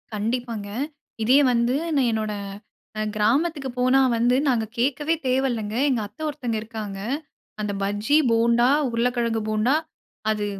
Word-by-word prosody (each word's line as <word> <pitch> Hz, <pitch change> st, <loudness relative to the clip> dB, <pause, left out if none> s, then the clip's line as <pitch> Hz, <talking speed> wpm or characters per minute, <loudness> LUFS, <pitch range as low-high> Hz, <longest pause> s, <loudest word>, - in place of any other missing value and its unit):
கண்டிப்பாங்க. 225 Hz, -1 st, -3 dB, 0.5 s
இதே 260 Hz, +5 st, +5 dB
வந்து 235 Hz, +1 st, +2 dB, 0.2 s
நான் 255 Hz, -4 st, +3 dB
என்னோட 215 Hz, -1 st, -1 dB, 0.7 s
அ -, -, 0 dB
கிராமத்துக்கு 275 Hz, +6 st, +1 dB
போனா 255 Hz, +2 st, +4 dB, 0.2 s
வந்து 245 Hz, +2 st, +3 dB
நாங்க 225 Hz, -3 st, +1 dB
கேட்கவே 290 Hz, +6 st, +1 dB
தேவையில்லைங்க. 240 Hz, -5 st, 0 dB
எங்க 250 Hz, -4 st, +1 dB
அத்தை 210 Hz, +9 st, -16 dB
ஒருத்தங்க 245 Hz, -5 st, -3 dB
இருக்காங்க. 215 Hz, -3 st, -6 dB, 0.6 s
அந்த 210 Hz, -1 st, -2 dB
பஜ்ஜி, 205 Hz, +9 st, +2 dB
போண்டா, 235 Hz, +1 st, +4 dB, 0.2 s
உருளைக்கிழங்கு 235 Hz, -1 st, 0 dB
போண்டா, 215 Hz, +5 st, +2 dB, 0.6 s
அது 210 Hz, -1 st, 0 dB
235 Hz, 125 wpm, -24 LUFS, 215-255 Hz, 0.7 s, இதே